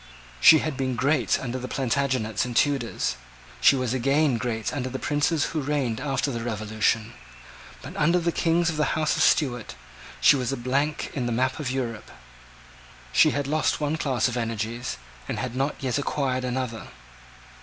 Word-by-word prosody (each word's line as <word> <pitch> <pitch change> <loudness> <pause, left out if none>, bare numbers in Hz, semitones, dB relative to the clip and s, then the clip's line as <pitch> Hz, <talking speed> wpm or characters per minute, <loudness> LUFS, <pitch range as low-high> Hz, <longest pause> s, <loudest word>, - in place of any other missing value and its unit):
She 160 - +9
had 155 -4 -3
been 130 -2 -1
great 140 +6 +1
under 130 0 -4
the 125 - -5
Plantagenets 130 -5 0
and 125 -2 -5
Tudors: 135 -3 0 0.4
she - - +6
was 130 -2 -1
again 135 +1 +2
great 110 -1 -2
under 130 -3 -3
the 130 - -4
princes 145 +2 +1
who 155 - -1
reigned 135 -5 -1
after 140 0 -1
the 115 -2 -4
Revolution: 110 0 -1 0.7
but, - - -9
under 170 +4 +3
the 170 -1 0
Kings 170 +1 +1
of 155 - -6
the 150 +1 0
House 155 -1 +1
of - - -1
Stuart, 125 -6 +2 0.4
she - - +6
was 130 -1 -1
a 135 - -2
blank 140 +5 -1
in 125 -4 -2
the - - -1
map 130 +4 0
of 145 -4 -2
Europe. 125 -4 -4 1.0
She 65 - +5
had 145 -1 -1
lost 155 +3 0
one 150 +1 0
class 130 -7 0
of 125 0 -3
energies, 115 +1 -3 0.3
and - - -3
had 125 -1 -4
not 135 +3 0
yet 130 +1 0
acquired 130 -3 -1
another. 125 -2 -3
130 Hz, 175 wpm, -25 LUFS, 120-145 Hz, 1.0 s, She